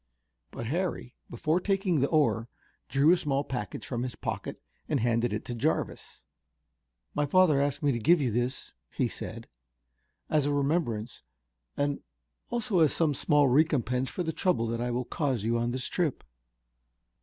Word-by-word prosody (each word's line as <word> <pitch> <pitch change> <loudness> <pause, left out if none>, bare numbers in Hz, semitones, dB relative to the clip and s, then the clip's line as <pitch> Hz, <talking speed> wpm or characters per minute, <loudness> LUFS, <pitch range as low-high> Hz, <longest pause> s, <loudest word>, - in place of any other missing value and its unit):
But 115 - -6
Harry, 165 -2 -2 0.2
before 155 +8 0
taking 190 -3 +1
the 140 - +2
oar, 140 -7 +2 0.4
drew 140 +4 +4
a 180 - +5
small 140 -4 0
package 120 -8 -5
from 120 -2 -3
his 125 -1 -4
pocket - - -4 0.3
and - - +1
handed 115 +1 +1
it 105 - -3
to 120 - -4
Jarvis. 115 - -2 0.9
"My 145 0 0
father 155 -3 +4
asked 145 +2 -1
me 145 - +4
to 120 - -1
give 170 +9 +5
you 130 -5 0
this," 120 +3 -2 0.2
he - - +1
said, - - -7 0.8
"as 150 -2 +2
a - - +1
remembrance 140 -6 -1 0.6
and 145 0 0 0.5
also 235 -5 0
as 155 -3 +5
some 160 -3 +1
small 145 +1 +3
recompense 130 -3 +2
for 180 - -3
the 160 -1 -2
trouble 140 -12 +1
that 115 0 -2
I 120 - -1
will 120 +1 -1
cause 135 - -1
you 115 +1 +1
on 120 +1 0
this 125 +1 -2
trip." 165 -7 -1
140 Hz, 165 wpm, -29 LUFS, 120-160 Hz, 0.9 s, a